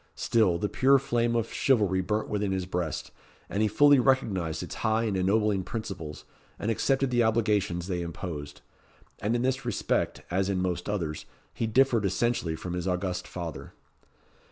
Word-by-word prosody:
Still, 105 -7 +2
the 105 - -1
pure 135 +5 +4
flame 120 -3 0
of 115 -1 -1
chivalry 105 -8 +2
burnt 105 +3 -1
within 105 -1 -1
his 95 -1 -1
breast, 90 -3 -3 0.4
and 100 - -2
he 110 - +4
fully 145 +6 +5
recognised 105 -11 +1
its - - -7
high 110 +1 +2
and 105 -4 -1
ennobling 100 +1 +2
principles, 95 -7 -6 0.3
and 110 - -1
accepted 135 +3 +1
the 120 -1 +3
obligations 105 -6 +1
they 90 -2 -2
imposed. 80 -4 -6 0.6
And 110 +3 +1
in 120 - 0
this 130 +1 0
respect, 120 -3 -1
as 95 +2 +1
in 95 -2 0
most 90 +1 -2
others, 85 -7 -3 0.3
he 115 - -2
differed 120 -1 +3
essentially 95 -3 0
from 90 +2 -6
his 90 +1 -3
august 90 0 -2
father. 85 -4 -7
100 Hz, 165 wpm, -28 LUFS, 90-115 Hz, 0.6 s, fully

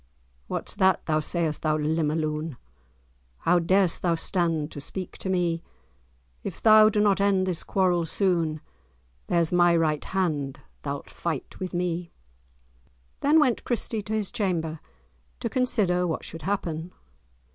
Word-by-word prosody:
"What's - - -3
that, 190 -2 +3
thou 155 -1 +1
sayst, 160 -1 -2
thou 155 -1 +1
limmer 155 0 0
loon? 155 -2 -3 0.8
How 175 +1 +4
darest 185 +1 +2
thou 170 -2 +2
stand 165 -3 0
to 145 - -7
speak 185 +5 -6
to 190 - -4
me? 175 -3 +1 0.8
If - - -6
thou 215 -1 +7
do 210 - 0
not 205 -2 +3
end 195 -2 +3
this 180 -3 -2
quarrel 180 -4 +1
soon, 165 -5 0 0.7
There's 170 -2 +2
my 175 -1 +5
right 155 -2 +1
hand, 150 -8 -1 0.2
thou'lt 140 -1 -5
fight 160 -6 -4
with 185 -1 -4
me!" 175 -1 -2 1.1
Then 300 +3 +4
went 260 -6 +2
Christie 230 -2 0
to 210 +2 -5
his 215 -3 -1
chamber, 165 -6 -1 0.6
to - - -2
consider 195 -8 +1
what 160 - -3
should 165 - -7
happen. 175 -3 -3
175 Hz, 145 wpm, -26 LUFS, 160-190 Hz, 1.1 s, thou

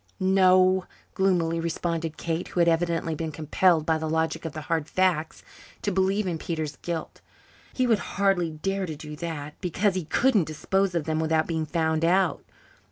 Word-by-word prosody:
"No," 185 -1 +4 0.3
gloomily 175 -4 +1
responded 165 -1 -2
Kate, 165 +1 -3
who - - -4
had 170 - +4
evidently 165 -1 +1
been 160 0 -4
compelled 160 +2 +2
by 160 -1 +1
the 160 0 -3
logic 160 +1 -1
of 160 - -5
hard 155 0 -2
facts 175 -4 0 0.4
to 205 - 0
believe 195 +2 +1
in 170 -3 -2
Peter's 155 -5 -4
guilt, 170 -2 -5 0.5
"he 255 - +1
would 225 -4 +3 0.2
hardly 195 -4 +2
dare 190 +5 -3
to 155 - -5
do 150 0 -8
that, 150 -3 -5
because 195 +2 +1
he 185 -3 -3
couldn't 220 - +2
dispose 180 +4 0
of 170 - 0
them 155 +1 -1
without 160 0 +1
being 160 -2 -2
found 160 0 0
out. 175 -2 +2
165 Hz, 170 wpm, -26 LUFS, 160-185 Hz, 0.5 s, No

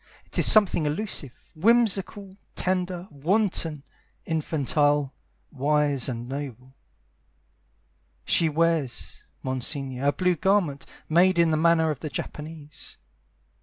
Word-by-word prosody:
It - - -3
is - - +8
something 200 -8 +5
elusive, 150 -2 -3 0.2
whimsical, 205 0 +1 0.2
tender, 180 -1 -2
wanton, 165 -1 0 0.4
infantile, 145 -3 0 0.4
wise 145 -1 +1
And 120 -1 -5
noble. 130 -2 -7 1.5
She 165 - +3
wears, 160 -4 -1 0.2
Monsignore, 130 +1 -2
a - - +5
blue 180 +3 +1
garment, 180 -7 0 0.2
Made 180 +3 +4
in 170 -1 +4
the - - +2
manner 160 0 +3
of 145 - -5
the 155 - -5
Japanese. 150 +2 -7
155 Hz, 105 wpm, -25 LUFS, 140-180 Hz, 1.5 s, is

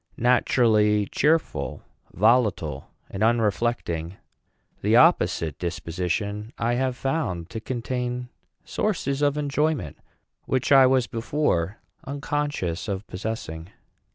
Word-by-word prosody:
Naturally 110 -4 +3
cheerful, 155 +9 0 0.3
volatile, 100 - +1 0.2
and 95 - -5
unreflecting, 110 -6 0 0.6
the - - +3
opposite 80 -4 +3
disposition 95 +5 -3
I 115 +3 0
have 130 +1 0
found 115 - -2
to 115 - -4
contain 125 +1 -3 0.4
sources 150 -9 -1
of 145 0 +2
enjoyment 150 - -1 0.5
which 130 +2 -1
I 135 -2 +8
was 130 -1 +3
before 115 - -1 0.3
unconscious 140 - -3
of 100 0 -3
possessing. 90 -5 -5
115 Hz, 100 wpm, -25 LUFS, 95-130 Hz, 0.6 s, I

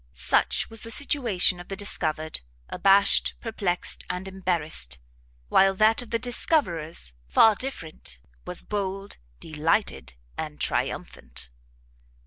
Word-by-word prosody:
Such 65 - +1
was 225 -1 -7
the 230 - -6
situation 230 -10 +2
of 175 - -10
the 195 - -4
discovered, 155 -5 -1 0.3
abashed, 195 +2 +4
perplexed, 200 -6 -2
and 180 +1 -4
embarrassed! 170 - 0 0.5
while 195 - +4
that 215 +4 +4
of 245 - -11
the 230 - +1
discoverers, 175 - 0
far 220 - +6
different, 165 - -6 0.2
was - - -3
bold, 195 -1 -4 0.2
delighted, 155 - -1 0.2
and 75 - -5
triumphant! 60 -1 -2
190 Hz, 110 wpm, -26 LUFS, 155-215 Hz, 0.5 s, far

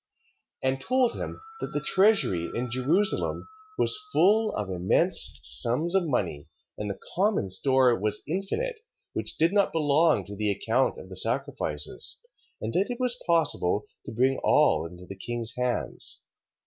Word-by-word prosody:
And 130 0 0
told 255 - +1
him, - - -6 0.2
that - - -6
the 150 - +1
treasury 185 - +2
in 120 +1 -3
Jerusalem 150 +11 0 0.3
was 425 - +3
full 215 - +3
of 105 -2 -3
immense 90 -1 +2
sums 150 +9 +1
of 190 -3 +2
money, 90 - -2 0.3
and 105 - -5
the 100 - -5
common 190 - 0
store 130 +4 +4
was 105 +1 -2
infinite, 435 - -3 0.3
which - - -3
did 165 +4 +3
not 200 -1 +2
belong 155 0 +2
to 100 - -8
the 105 +1 0
account 100 - 0
of - - -11
the - - -9
sacrifices: 75 0 0 0.4
and 110 +1 -4
that 195 +5 +1
it 245 0 -5
was 250 -1 -1
possible 155 - +1 0.2
to - - -7
bring 130 +4 +1
all - - +3
into 90 +1 -13
the 100 - -8
king's 120 +4 -3
hands. 125 -1 -2
130 Hz, 155 wpm, -26 LUFS, -, 0.4 s, store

